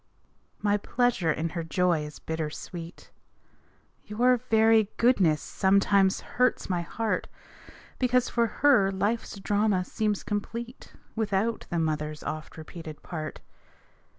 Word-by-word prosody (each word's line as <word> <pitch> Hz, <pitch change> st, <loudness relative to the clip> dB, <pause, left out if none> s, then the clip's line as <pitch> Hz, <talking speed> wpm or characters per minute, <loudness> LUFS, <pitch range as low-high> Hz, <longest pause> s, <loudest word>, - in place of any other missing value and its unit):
My 205 Hz, 0 st, +3 dB
pleasure 220 Hz, -6 st, +1 dB
in 160 Hz, +2 st, -2 dB
her 170 Hz, 0 st, -4 dB
joy 170 Hz, -1 st, +1 dB
is 150 Hz, -, -11 dB
bitter 160 Hz, -1 st, -3 dB
sweet. 170 Hz, +2 st, -9 dB, 0.9 s
Your 245 Hz, +4 st, +2 dB
very 220 Hz, -1 st, +5 dB
goodness 185 Hz, -, +3 dB
sometimes 195 Hz, 0 st, +3 dB
hurts 250 Hz, 0 st, 0 dB
my 180 Hz, -2 st, 0 dB
heart, 220 Hz, +6 st, -2 dB, 0.7 s
Because, 250 Hz, -1 st, +2 dB
for 235 Hz, -1 st, +1 dB
her, 235 Hz, -4 st, +4 dB
life's 205 Hz, +3 st, -2 dB
drama 205 Hz, -2 st, +1 dB
seems 210 Hz, +1 st, -1 dB
complete 230 Hz, +4 st, -5 dB, 0.2 s
Without 220 Hz, +1 st, -1 dB
the 170 Hz, -, -2 dB
mother's 155 Hz, -1 st, -2 dB
oft 155 Hz, +1 st, -6 dB
repeated 160 Hz, -1 st, -9 dB
part. 155 Hz, -3 st, -6 dB
200 Hz, 120 wpm, -27 LUFS, 165-225 Hz, 0.9 s, very